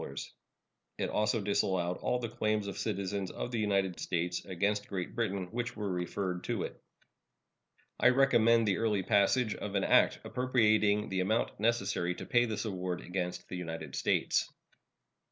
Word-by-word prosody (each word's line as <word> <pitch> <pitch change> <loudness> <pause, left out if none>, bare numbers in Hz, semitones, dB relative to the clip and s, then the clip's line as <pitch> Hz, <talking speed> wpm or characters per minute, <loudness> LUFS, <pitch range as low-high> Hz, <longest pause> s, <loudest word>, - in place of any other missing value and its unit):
It - - -2
also 105 +1 +1
disallowed 95 -3 0
all 125 - 0
the 120 -1 -3
claims 110 -1 -1
of 100 - -5
citizens 100 -2 -2
of 125 - -5
the 115 - -1
United 100 -4 0
States 90 0 -2
against 100 +3 -1
Great 95 -3 -4
Britain 100 -5 -2
which 120 +1 -3
were 105 -2 -3
referred 90 0 -3
to - - -1
it. - - -7 1.2
I 120 - +6
recommend 115 -4 +4
the 95 -3 +1
early 105 -4 +1
passage 105 +3 +3
of 105 -1 -6
an 95 - +2
act - - +4
appropriating 110 -4 +2
the 95 - -1
amount 110 +4 0
necessary 100 -6 0
to - - -7
pay 120 -1 +3
this 110 -1 -3
award 90 -3 -3
against 90 -1 -4
the 90 - -5
United 80 -2 -6
States. - - +1
100 Hz, 155 wpm, -31 LUFS, 95-110 Hz, 1.2 s, I